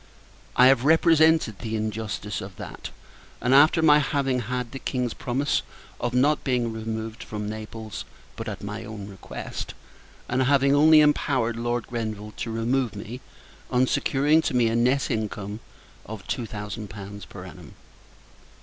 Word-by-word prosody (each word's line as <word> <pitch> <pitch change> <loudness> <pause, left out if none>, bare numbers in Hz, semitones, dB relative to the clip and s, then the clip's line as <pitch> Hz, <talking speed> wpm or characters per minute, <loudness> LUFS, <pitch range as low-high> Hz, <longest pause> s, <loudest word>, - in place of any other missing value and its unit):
I 125 - +7
have 130 -2 +5
represented 160 -6 +4
the 110 -1 -3
injustice 110 -4 -3
of 95 0 -8
that - - -8 0.5
after 145 +6 +5
my 150 -1 +7
having 135 -3 0
had 125 +1 -3
the 135 - -6
King's 125 -4 -2
promise 135 +4 0 0.4
of 120 - -1
not 145 +4 +3
being 120 -4 0
removed 110 0 -5
from 105 -1 -5
Naples, 110 0 -6 0.3
but - - -6
at - - -7
my 105 +2 -5
own 105 -2 -7
request; 100 -2 -7 0.5
and 130 +2 0
having 140 +1 +4
only 155 +1 +7
empowered 130 -5 +2
Lord 120 0 -1
Grenville 110 -3 -5
to 115 - -3
remove 115 +1 0
me, 115 +5 -7 0.5
on 125 0 +3
securing 140 +3 +2
to 160 - -2
me 120 -2 +4
a 115 - 0
nett 125 +4 +2
income 105 -1 -3 0.5
of 105 -3 -8
two 120 -3 -2
thousand 105 0 -6
pounds 100 -1 -8
per - - -10
annum. - - -12
120 Hz, 150 wpm, -25 LUFS, 110-135 Hz, 0.5 s, I